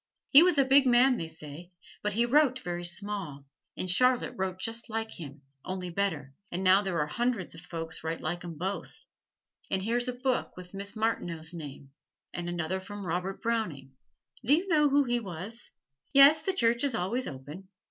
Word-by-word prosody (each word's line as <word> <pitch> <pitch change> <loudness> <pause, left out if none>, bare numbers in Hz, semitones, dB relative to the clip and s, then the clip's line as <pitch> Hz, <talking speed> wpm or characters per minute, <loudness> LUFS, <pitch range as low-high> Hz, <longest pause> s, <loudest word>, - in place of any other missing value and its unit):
He 285 - +10
was 355 -2 +4
a 275 - +5
big 270 0 +5
man 250 +1 +5
they 165 - -4
say, 160 +2 -10 0.3
but 210 0 -1
he 235 +3 +2
wrote 265 0 +4
very 175 0 -4
small, 175 -6 -3 0.3
and 185 - -2
Charlotte 250 +7 +3
wrote 190 -1 -2
just 230 +4 -2
like 225 0 -3
him, 145 -3 -9 0.2
only 185 -1 -4
better, 170 -8 -2 0.2
and 180 +2 -3
now 190 +1 +6
there 190 -4 -2
are 150 - +2
hundreds 230 +4 -1
of 165 - -11
folks 165 -3 -6
write 165 +1 -3
like 175 +3 -3
'em 170 -2 -7
both. 190 +5 -5 0.6
Then 190 - 0
here's 240 +4 0
a 250 - -1
book 255 -3 -2
with 180 0 -11
Miss 200 +2 -5
Martineau's 175 -7 -2
name, 140 -4 -9 0.4
and 175 0 -4
another 175 +2 -2
from 205 +1 -8
Robert 180 +3 -3
Browning 175 -13 -2 0.5
do 265 +6 +5
you 355 +5 -2
know 300 -3 +4
who 285 +1 +4
he 240 -2 0
was? 200 +3 -6 0.4
Yes, 280 +3 +8
the 385 - -1
church 235 -6 +2
is 275 -5 +1
always 225 +7 -1
open. 145 +8 -9
190 Hz, 190 wpm, -29 LUFS, 170-240 Hz, 0.6 s, He